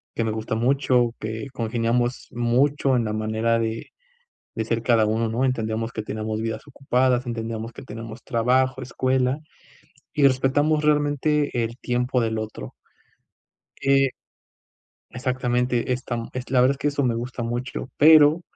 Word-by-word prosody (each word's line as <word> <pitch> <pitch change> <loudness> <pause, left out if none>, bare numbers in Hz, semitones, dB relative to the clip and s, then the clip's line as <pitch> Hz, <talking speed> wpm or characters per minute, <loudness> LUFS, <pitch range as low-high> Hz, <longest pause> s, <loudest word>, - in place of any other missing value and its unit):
que 115 - 0
me 110 - 0
gusta 110 +1 -3
mucho, 125 0 +2
que 110 +2 -4
congeniamos 120 +1 -1
mucho 130 +3 +2
en 120 -2 +1
la 105 - -2
manera 110 +2 0
de 115 0 -2 0.7
de 110 - -2
ser 115 +1 -1
cada 115 -2 +3
uno, 110 +2 0
¿no?, 115 +4 0
entendíamos 115 -2 -1
que 110 - -4
teníamos 110 +1 -4
vidas 115 -1 -3
ocupadas, 130 -2 +1
entendíamos 115 -1 -4
que - - -10
tenemos 115 +1 -8
trabajo, 130 +2 +1
escuela, 130 +1 0 0.8
y 145 -3 +5
respetamos 145 +4 +1
realmente 150 0 +2
el 115 +1 -5
tiempo 125 +1 0
del 110 -1 -1
otro. 110 0 -6 1.1
Eh 135 0 +4 1.0
exactamente, 125 -1 -1
esta 125 -1 -2
la 125 +2 -1
verdad 130 +2 +5
es 140 - -4
que 145 - -1
eso 145 0 -1
me 120 -3 +1
gusta 120 +1 -4
mucho, 120 +2 -4
pero, 155 +1 +7
125 Hz, 145 wpm, -24 LUFS, 115-130 Hz, 1.1 s, pero